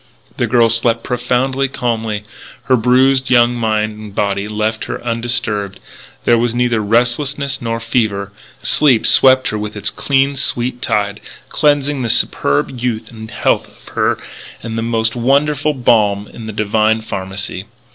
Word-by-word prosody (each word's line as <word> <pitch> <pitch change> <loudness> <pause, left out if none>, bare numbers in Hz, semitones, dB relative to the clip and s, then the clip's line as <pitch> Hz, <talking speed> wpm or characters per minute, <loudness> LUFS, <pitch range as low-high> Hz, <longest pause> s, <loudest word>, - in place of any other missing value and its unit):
The - - 0
girl 120 -2 +4
slept 115 0 +1
profoundly, 125 +2 0
calmly. 115 -5 -2 0.4
Her 130 +3 +3
bruised 130 +2 +3
young 120 -1 +4
mind 110 -2 -1
and 105 -2 -10
body 100 0 -1
left 110 +1 -2
her - - -5
undisturbed. 115 -4 -2 0.5
There 120 -1 +4
was 120 0 0
neither 120 -2 +1
restlessness 135 +6 0
nor 115 -1 -2
fever. 110 -4 -1 0.3
Sleep 130 0 +3
swept 130 -1 +5
her 105 - -3
with 105 0 -5
its 105 - -2
clean, 140 0 +1
sweet 125 -2 -2
tide, 100 0 -1 0.3
cleansing 145 -2 +1
the 120 - -2
superb 70 - 0
youth 120 -2 -3
and 110 -1 -9
health - - 0
of - - -18
her - - +1 0.5
with 115 -1 -5
the 115 - -1
most 115 0 0
wonderful 145 +4 +1
balm 105 -5 +2
in 115 -2 -9
the - - -4
Divine 110 +1 +1
pharmacy. 95 -2 -5
115 Hz, 150 wpm, -16 LUFS, 110-125 Hz, 0.5 s, swept